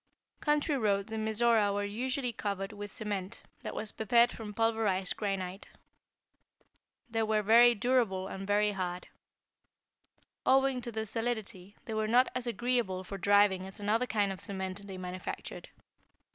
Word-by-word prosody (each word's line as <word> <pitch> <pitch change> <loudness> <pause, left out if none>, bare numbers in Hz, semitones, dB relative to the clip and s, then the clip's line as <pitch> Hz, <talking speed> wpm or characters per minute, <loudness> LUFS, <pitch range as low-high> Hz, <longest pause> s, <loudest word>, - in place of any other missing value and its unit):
Country 295 0 +1
roads 200 -1 0
in 220 -1 -2
Mizora 220 -1 +3
were 205 0 -1
usually 250 +4 -2
covered 200 -2 -3
with 205 0 -7
a - - -11
cement 200 -3 -4 0.2
that - - -6
was 215 - -2
prepared 235 +2 +4
from 220 -2 -7
pulverized 215 -4 +1
granite. 195 -2 -3 1.4
They 225 -1 -1
were 215 -1 +1
very 235 +3 +7
durable 210 -5 +1
and 195 0 -6
very 210 +1 +3
hard. 180 -2 -4 1.3
Owing 270 -1 +3
to 235 - -5
their 220 0 -3
solidity, 220 -4 -4
they 225 - -5
were 215 0 0
not 245 +3 +4
as 250 -1 -3
agreeable 235 -5 0
for 195 +1 -7
driving 200 -1 +4
as 190 - -10
another 220 +4 +1
kind 205 -4 +1
of 190 - -7
cement 190 0 -5
they 190 -1 -7
manufactured. 180 0 -6
210 Hz, 150 wpm, -31 LUFS, 195-235 Hz, 1.4 s, very